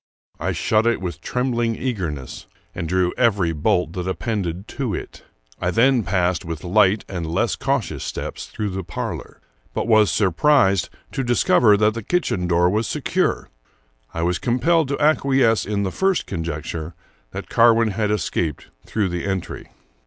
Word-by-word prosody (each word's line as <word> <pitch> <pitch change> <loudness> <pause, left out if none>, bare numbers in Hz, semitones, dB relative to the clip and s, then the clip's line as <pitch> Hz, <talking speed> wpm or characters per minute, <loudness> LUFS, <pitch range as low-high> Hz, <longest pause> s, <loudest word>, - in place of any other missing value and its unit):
I - - -1
shut 110 +1 +1
it 115 - +2
with 90 -2 -5
trembling 120 -2 -1
eagerness, 85 - -4 0.3
and 85 -3 -4
drew 90 0 +1
every 100 -9 +2
bolt 80 +2 0
that 90 -1 -4
appended 95 -2 -3
to 125 -9 -3
it. - - -8 0.4
I 90 - +1
then 120 +6 +3
passed 90 -3 0
with 80 -2 -6
light 100 +2 +3
and 85 -4 -4
less 80 - 0
cautious - - -2
steps - - -5
through 105 -2 -4
the 95 +1 -4
parlor, 85 -2 -6 0.4
but - - -1
was 110 -3 +5
surprised 100 - +3 0.2
to 135 - -2
discover 120 -3 +4
that 105 +1 +3
the 115 - -5
kitchen 105 - -1
door 85 0 +3
was 105 +4 0
secure. - - -1 0.6
I 80 - -3
was 85 -1 0
com 120 +5 0
pelled 160 +3 +3
to 140 - -2
acquiesce 135 -7 +3
in 100 -1 -1
the 95 - -2
first 190 -2 +1
conjecture 80 0 -5 0.3
that - - -7
Carwin 115 -1 +5
had 105 +1 -1
escaped 85 -7 -2 0.2
through 105 -4 0
the 90 -1 -3
entry. 95 -2 -4
100 Hz, 160 wpm, -22 LUFS, 90-115 Hz, 0.6 s, was